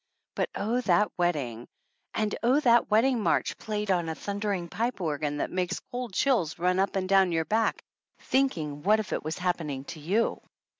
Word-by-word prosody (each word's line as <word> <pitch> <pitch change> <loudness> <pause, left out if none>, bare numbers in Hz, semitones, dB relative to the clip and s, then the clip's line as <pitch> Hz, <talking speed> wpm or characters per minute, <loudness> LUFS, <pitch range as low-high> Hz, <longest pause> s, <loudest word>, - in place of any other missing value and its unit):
But - - -1
oh, 230 +5 0
that 195 -2 +3
wedding! 140 -10 -1 0.5
And 215 -1 0
oh, 255 +5 +4
that 235 -4 +4
wedding 230 +3 +3
march - - +1
played 210 -2 -2
on 175 -3 +1
a 160 - -3
thundering 200 -3 -3
pipe 230 +7 -2
organ 150 -3 -2
that - - -2
makes 185 +1 -1
cold 245 -2 -4
chills 210 - +1
run 180 +2 +1
up 195 +1 +1
and 190 -1 0
down 190 -1 +4
your 165 -1 0
back 225 +4 0 0.3
thinking 160 - 0
what 210 +6 +4
if 205 -3 -4
it - - -2
was 155 +1 -3
happening 160 -7 -2
to 160 - -11
you 195 +10 0
190 Hz, 185 wpm, -28 LUFS, 165-220 Hz, 0.5 s, oh